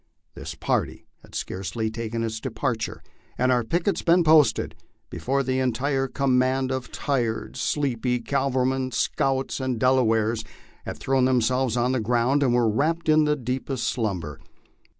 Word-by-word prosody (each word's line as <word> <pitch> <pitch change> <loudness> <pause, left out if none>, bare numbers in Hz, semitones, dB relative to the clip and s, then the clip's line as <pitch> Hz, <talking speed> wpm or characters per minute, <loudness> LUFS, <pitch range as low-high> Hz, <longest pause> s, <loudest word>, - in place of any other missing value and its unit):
This - - -7
party - - -2 0.2
had - - -15
scarcely 100 +4 -3
taken 115 0 -3
its 110 -1 -3
departure 115 -1 -3 0.3
and 130 +1 +2
our 125 -1 +2
pickets 170 - 0
been 175 +1 +4
posted, 155 -2 +4 0.4
before 135 +2 -1
the 130 0 0
entire 135 +2 0
command 130 0 +1
of 130 -1 -4
tired, 120 -6 -2
sleepy 125 -4 0
cavalrymen, 130 0 0
scouts, 135 0 0
and 130 -3 -2
Delawares 115 -3 +2 0.4
had - - -5
thrown 135 -1 +1
themselves 125 -1 +1
on 120 +1 +2
the 130 - 0
ground 120 +5 +2
and 130 -3 +3
were 120 -2 +3
wrapped 155 +10 0
in 155 0 +5
the 150 0 +2
deepest 130 -2 -3
slumber. 95 - -2
130 Hz, 145 wpm, -25 LUFS, 115-135 Hz, 0.4 s, in